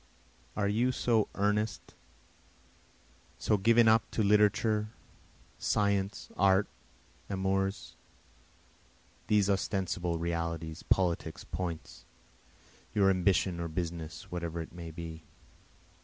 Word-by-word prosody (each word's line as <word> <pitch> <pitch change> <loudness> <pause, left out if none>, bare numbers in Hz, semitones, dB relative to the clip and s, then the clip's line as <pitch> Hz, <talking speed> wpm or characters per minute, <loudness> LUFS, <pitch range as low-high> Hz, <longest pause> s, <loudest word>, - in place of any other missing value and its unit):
Are 105 -2 +1
you 115 +5 +2
so 115 -4 +2
earnest, 105 +1 -1 1.4
so 105 - +2
given 115 +3 +5
up 110 0 +4
to 110 - 0
literature, 105 +1 +3 0.7
science, 100 -1 0
art, 95 +1 +4 0.6
amours? 95 0 -1 1.3
These 105 -2 +3
ostensible 95 -3 -1
realities, 85 -1 -3
politics, 90 -3 0
points? 85 -4 -6 0.9
Your 100 -2 +5
ambition 95 -1 +2
or 85 - -2
business 80 -1 -5
whatever 85 -1 -3
it 80 - -7
may 85 -1 -7
be? 80 0 -7
95 Hz, 95 wpm, -31 LUFS, 85-105 Hz, 1.4 s, given